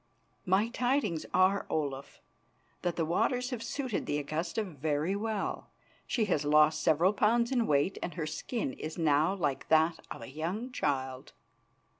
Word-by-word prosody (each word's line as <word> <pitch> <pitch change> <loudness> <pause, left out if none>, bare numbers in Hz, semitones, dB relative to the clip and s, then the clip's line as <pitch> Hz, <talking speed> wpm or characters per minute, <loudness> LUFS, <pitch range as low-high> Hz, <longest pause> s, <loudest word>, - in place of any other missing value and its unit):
"My 195 +5 +3
tidings 245 - 0
are, 185 +2 +3
Olaf, 140 -3 -3 0.6
that 175 -1 -1
the 165 - 0
waters 245 - 0
have 245 -3 -3
suited 260 -3 -3
the 145 - 0
Augusta 160 +8 -2
very 155 0 -1
well. 215 0 -3 0.4
She 225 - +1
has 165 -7 +1
lost 150 +1 +4
several 170 +5 +3
pounds 235 +4 +2
in 240 -4 +2
weight 145 +6 +2
and 175 - -4
her 165 -3 -2
skin 155 - -3
is 155 +4 -6
now 160 +3 +3
like 150 -8 -2
that 160 +1 +3
of - - -7
a - - -8
young 180 - -3
child." 130 - -2
170 Hz, 155 wpm, -31 LUFS, 150-215 Hz, 0.6 s, lost